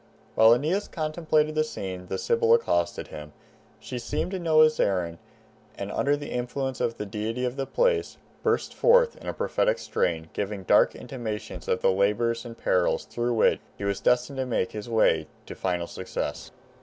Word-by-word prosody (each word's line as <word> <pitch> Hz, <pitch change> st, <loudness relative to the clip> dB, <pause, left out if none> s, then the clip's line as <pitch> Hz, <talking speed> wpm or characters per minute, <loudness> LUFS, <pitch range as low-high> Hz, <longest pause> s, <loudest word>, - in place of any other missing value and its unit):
While 110 Hz, +1 st, +7 dB
Aeneas 165 Hz, +11 st, -1 dB
contemplated 155 Hz, -1 st, 0 dB
the 155 Hz, 0 st, +2 dB
scene, 95 Hz, -10 st, -6 dB
the -, -, -3 dB
Sibyl 465 Hz, -1 st, +3 dB
accosted 85 Hz, -, -1 dB
him. 75 Hz, 0 st, -9 dB, 0.5 s
She 125 Hz, -, -6 dB
seemed 120 Hz, +9 st, -3 dB
to 190 Hz, -, -3 dB
know 160 Hz, -2 st, +4 dB
his 155 Hz, 0 st, +4 dB
errand, 85 Hz, -4 st, 0 dB, 0.6 s
and -, -, -5 dB
under 145 Hz, +1 st, +1 dB
the 145 Hz, -, -7 dB
influence 130 Hz, +2 st, -3 dB
of 115 Hz, 0 st, -1 dB
the 105 Hz, -, -4 dB
deity 110 Hz, +4 st, -3 dB
of 125 Hz, 0 st, -2 dB
the 135 Hz, -1 st, -3 dB
place, 485 Hz, -4 st, +1 dB, 0.2 s
burst -, -, 0 dB
forth 485 Hz, 0 st, +4 dB
in -, -, -11 dB
a -, -, -2 dB
prophetic -, -, +1 dB
strain, 80 Hz, -, -2 dB
giving 100 Hz, -1 st, -3 dB
dark -, -, +4 dB
intimations 110 Hz, -5 st, -6 dB
of 90 Hz, -, 0 dB
labors 105 Hz, +5 st, +2 dB
and 115 Hz, -1 st, -9 dB
perils 90 Hz, -1 st, +1 dB
through 120 Hz, 0 st, -2 dB
which 110 Hz, -, +3 dB, 0.2 s
he -, -, -7 dB
was 100 Hz, -1 st, -1 dB
destined 125 Hz, +2 st, +1 dB
to 130 Hz, -, -1 dB
make 110 Hz, -6 st, 0 dB
his 105 Hz, +2 st, -7 dB
way 80 Hz, -9 st, +3 dB, 0.2 s
to -, -, -8 dB
final 90 Hz, -2 st, -2 dB
success. 95 Hz, +2 st, -5 dB
120 Hz, 180 wpm, -26 LUFS, 100-155 Hz, 0.6 s, While